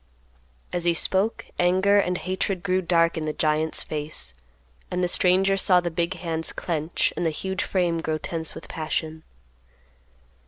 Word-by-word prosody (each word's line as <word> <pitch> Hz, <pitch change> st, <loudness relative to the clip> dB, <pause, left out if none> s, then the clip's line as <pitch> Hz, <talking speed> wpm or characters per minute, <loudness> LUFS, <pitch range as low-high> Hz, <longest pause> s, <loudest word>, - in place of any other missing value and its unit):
As 175 Hz, -1 st, -1 dB
he 170 Hz, -1 st, +3 dB
spoke, 195 Hz, +6 st, 0 dB
anger 190 Hz, +3 st, +4 dB
and 180 Hz, -2 st, +1 dB
hatred 185 Hz, 0 st, -2 dB
grew 185 Hz, -1 st, +1 dB
dark 170 Hz, -1 st, +2 dB
in 155 Hz, -, -3 dB
the 155 Hz, -, -2 dB
giant's 155 Hz, +1 st, 0 dB
face, 150 Hz, -, -4 dB, 0.6 s
and 180 Hz, 0 st, -1 dB
the -, -, +3 dB
stranger 190 Hz, +2 st, +4 dB
saw 185 Hz, -1 st, +4 dB
the 175 Hz, -1 st, -3 dB
big 170 Hz, +2 st, -1 dB
hands 165 Hz, -2 st, -3 dB
clench 160 Hz, -1 st, -1 dB
and 175 Hz, -, -2 dB
the 165 Hz, -, +2 dB
huge 190 Hz, +5 st, -3 dB
frame 175 Hz, -3 st, 0 dB
grow 155 Hz, -1 st, -1 dB
tense 160 Hz, 0 st, -4 dB
with -, -, -9 dB
passion. 160 Hz, 0 st, -3 dB
175 Hz, 160 wpm, -25 LUFS, 160-185 Hz, 0.6 s, anger